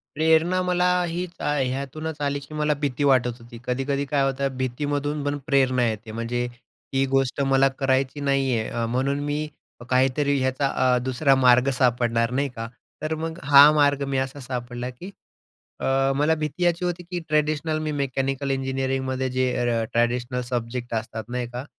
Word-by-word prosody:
प्रेरणा 160 +4 +3
मला, 180 0 +2 0.2
हीच 175 +1 -3
अ, - - -4
ह्यातूनच 140 +4 -3
आली, 140 0 0
की 140 +2 -13
मला 150 0 +1
भीती 145 0 -1
वाटत 125 -3 +3
होती, 120 0 -12
कधी-कधी 135 +3 -1
काय 140 +1 0
होतं 135 -1 -1
भीतीमधून 145 +3 -2
पण 145 0 -1
प्रेरणा 130 -3 +3
येते, 110 0 -4
म्हणजे 115 +2 -2 0.5
ही 135 0 +2
गोष्ट 135 0 +1
मला 135 0 +5
करायची 135 +1 +1
नाही 135 -3 +1
आहे, 110 - -2
अ, 115 -1 -2
म्हणून 135 +4 0
मी 150 +1 -1 0.4
काहीतरी 135 +2 +2
याचा 130 +2 +1
अ, 125 -2 +2
दुसरा 135 +2 +2
मार्ग 125 0 +5
सापडणार, 120 -2 +2
नाही 140 +2 0
का. 115 0 -5 0.3
तर 155 +1 -1
मग 165 +2 -5
हा 145 +1 +8
मार्ग 145 -1 +3
मी 135 -1 -1
असा 135 +2 -2
सापडला, 125 -1 -5
की 175 +11 -10 0.7
अ, 135 0 +2
मला 150 +3 +2
भीती 155 +3 -3
याची 175 0 +1
होती, 175 0 -3
की 175 +1 -5
ट्रॅडिशनल 155 +1 +1
मी 155 -1 -2
मेकॅनिकल 135 +1 -1
इंजिनिअरिंगमध्ये 130 -1 -1
जे 130 0 +1
अ, 120 -2 +1
ट्रॅडिशनल 120 +2 0
सब्जेक्ट 120 0 -3
असतात, 110 0 -3
नाही 125 0 -3
का? 125 +3 -5
135 Hz, 170 wpm, -24 LUFS, 125-145 Hz, 0.7 s, हा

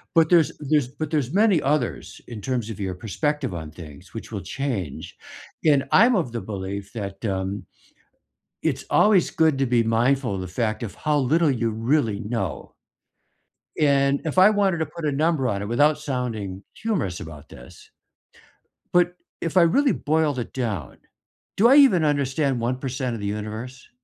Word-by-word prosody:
But 165 -1 +5
there's 170 -4 +4
there's, 150 -3 +1
but 145 +3 -5
there's 145 -4 0
many 200 -4 +4
others 145 +3 -2
in 115 -3 -8
terms 120 -2 -2
of 105 -3 -7
your 95 -2 -3
perspective 110 +7 -2
on 80 -2 -7
things 80 +1 -12
which 115 0 -8
will 100 - -3
change, 110 - -4 0.5
and 140 -3 +4
I'm 240 +2 +6
of 160 - -1
the 115 - -3
belief 100 0 -6
that, 100 -2 -6
um, 95 -1 -3 1.0
it's - - -1
always 205 -4 +4
good 160 -3 +2
to 135 - +1
be 120 -1 +3
mindful 120 +1 +1
of - - -4
the 90 - -6
fact 110 +4 -2
of 110 -5 -5
how 150 -1 0
little 155 +4 +2
you 115 -3 0
really 115 -1 0
know. 105 -6 -4 1.0
And 140 -2 +3
if 160 +3 -3
I 190 +3 +8
wanted 200 -4 +2
to 160 - 0
put 155 +1 -7
a 145 - +1
number 150 -2 +1
on 100 -3 -1
it 100 - -4
without 145 +6 +3
sounding 115 -9 -4
humorous 185 - -2
about 80 -4 -10
this, 60 - -14 1.0
but 175 0 +3 0.3
if 165 +2 -2
I 180 - +8
really 270 - +4
boiled 155 -3 0
it 120 - -6
down, 105 - -4 0.6
do 225 +4 +6
I 265 - +6
even 250 - +6
understand 140 -2 0
1% 125 +1 -2
of - - -6
the 100 - -3
universe? 110 +5 -6
130 Hz, 170 wpm, -23 LUFS, 105-155 Hz, 1.0 s, I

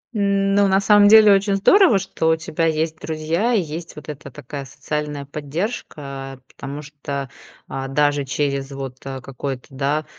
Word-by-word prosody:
М, 200 -1 +1
ну, 200 0 +4
на 190 0 +3
самом, 205 0 +6
деле 215 -1 +8
очень 195 0 +2
здорово, 340 - +5
что 190 -4 -1
у 160 - +4
тебя 160 0 -1
есть 160 0 -1
друзья 165 +9 -1
и 215 - +3
есть 165 +1 -7
вот 150 0 -11
эта 145 -1 -8
такая 135 +3 -7
социальная 150 +1 -4
поддержка. 140 - -5 0.2
Потому 140 +2 -7
что, 140 -2 -6 0.4
а, 135 0 -4
даже 145 +1 +1
через 140 0 -2
вот, 135 -2 -6
а, 135 -1 -5
какое-то, 135 0 -6
да, 140 +3 -1
150 Hz, 165 wpm, -21 LUFS, 140-195 Hz, 0.4 s, деле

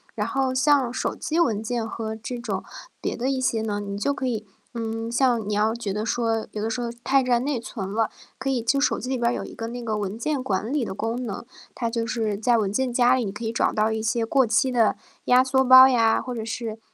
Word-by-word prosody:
然 210 0 -1
后 265 0 0
像 265 -2 +3
手 - - -2
机 320 +2 -2
文 220 -11 +2
件 225 0 -2
和 220 -1 -4
这 225 +3 -6
种 205 -5 -3 0.4
别 - - -2
的 250 +2 -1
一 270 -1 0
些 235 -3 +1
呢， 210 -2 -2
你 200 -1 -5
就 280 +8 0
可 275 - -4
以 220 -3 -2 0.3
嗯， 225 0 -3
像 240 -3 +2
你 - - -1
要 215 +2 +2
觉 225 -4 -4
得 210 +2 -2
说， 225 -2 0
有 210 - -5
的 - - 0
时 235 - -3
候 235 - -2
太 270 0 +3
占 245 -1 +2
内 280 -3 -1
存 200 -5 -6
了， 225 +1 +1 0.3
可 270 - -2
以 260 -2 +1
就 275 +4 +2
手 280 - +2
机 - - -6
里 260 - 0
边 235 - +2
儿 - - -1
有 - - -3
一 - - -10
个 225 - -5
那 245 +1 -6
个 220 -2 -2
文 205 +1 -3
件 280 +2 -1
管 210 0 -2
理 295 - +1
的 - - -5
功 225 +4 -2
能， 205 +3 -6 0.3
它 235 - -2
就 230 -1 -1
是 225 -4 -1
在 235 +2 +2
文 205 -3 0
件 260 +1 0
夹 245 +1 +4
里， 255 - 0
你 195 - -3
可 210 +4 -8
以 225 - -1
找 - - +2
到 215 +1 +1
一 220 0 -2
些 225 +1 0
过 265 +2 +3
期 260 +4 +2
的 230 -4 +3 0.3
压 250 +1 +5
缩 265 0 +2
包 260 +1 +10
呀， 230 -3 +3
或 250 - -5
者 225 - -4
是 225 -1 -5
235 Hz, 285 characters per minute, -24 LUFS, 220-255 Hz, 0.4 s, 包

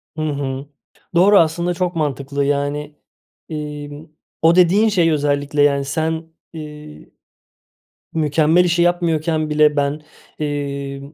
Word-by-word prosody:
Hı 155 - -4
hı. 140 -3 -3 0.5
Doğru, 195 +4 +6
aslında 170 +2 +1
çok 180 0 -2
mantıklı. 140 -2 -2
Yani, 145 +1 -2 0.5
emm, 150 0 -7 0.4
o 165 +2 +5
dediğin 190 +5 +4
şey 175 -5 +2
özellikle, 145 0 0
yani, 140 -1 +3
sen, 160 +3 -2 0.3
ııı, 150 -1 -10 1.1
mükemmel 160 +2 +3
işi 170 -1 +2
yapmıyorken 165 -3 0
bile 150 0 +3
ben, 145 +1 0 0.4
eee, 140 -2 -4
150 Hz, 115 wpm, -19 LUFS, 145-165 Hz, 1.1 s, Doğru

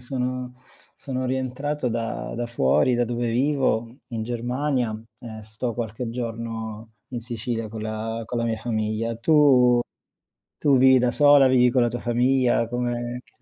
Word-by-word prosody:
sono 125 0 -3 0.4
sono 130 -2 -4
rientrato 130 +2 -2
da 115 -1 -3
da 120 0 -3
fuori, 75 - +2
da 120 - +2
dove 120 0 -2
vivo 130 -2 +1 0.2
in 115 -3 -4
Germania 120 -1 -2 0.2
e 110 -2 -9
sto 110 +3 -4
qualche 115 +1 -4
giorno 115 -2 -5
in 120 -2 -5
Sicilia 115 -1 -4
con 110 +1 -7
la 110 +1 -4
con 120 - -3
la 115 - 0
mia 115 -1 -1
famiglia. 110 0 -2
Tu 125 -2 +5 0.8
tu 140 -3 +3
vivi 130 0 +6
da 125 -1 +2
sola, 145 -1 +6
vivi 125 -1 +4
con 125 0 +2
la 120 - +3
tua 120 - -4
famiglia? 120 -1 +2
Come 120 0 -3
che - - -29
120 Hz, 155 wpm, -24 LUFS, 115-125 Hz, 0.8 s, vivi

